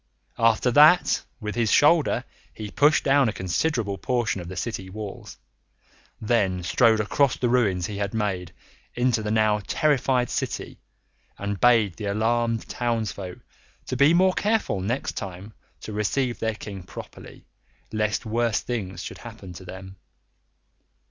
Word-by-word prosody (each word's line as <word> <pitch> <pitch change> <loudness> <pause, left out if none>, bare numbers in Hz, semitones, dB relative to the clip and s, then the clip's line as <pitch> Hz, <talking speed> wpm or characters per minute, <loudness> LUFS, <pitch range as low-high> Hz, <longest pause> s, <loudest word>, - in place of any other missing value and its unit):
After 115 +2 +3
that, 150 +7 +6 0.2
with 105 -3 -4
his 115 -3 0
shoulder 150 0 +4 0.3
he 105 -1 -7
pushed 145 +2 +3
down 140 -3 +4
a - - -3
considerable 100 - -1
portion 120 -6 -1
of 85 - -8
the 95 - -7
city 95 0 -4
walls, 105 0 -8 0.8
then 100 -5 0
strode 110 +4 +3
across 125 +5 +1
the 125 - 0
ruins 105 -8 +2
he 105 -1 -5
had 100 -1 -2
made 95 -5 -2 0.4
into 120 -2 +1
the 105 - -3
now 110 -1 +2
terrified 135 -4 +1
city, - - -4 0.6
and 100 -1 -4
bade 115 -7 +4
the 105 - -5
alarmed 115 +3 0
townsfolk 110 -6 -3 0.4
to 130 - -3
be 140 +4 +5
more 185 +2 +4
careful 210 - 0
next 120 +8 -2
time 95 +3 -7 0.3
to 110 - -7
receive 120 +4 -1
their 110 -1 -1
King 100 -2 -8
properly, 90 - -11 0.5
lest 105 +1 -1
worse 115 0 +1
things 100 -6 -4
should - - -8
happen 110 -6 -10
to 90 +2 -11
them. 95 +1 -10
110 Hz, 145 wpm, -25 LUFS, 100-125 Hz, 0.8 s, that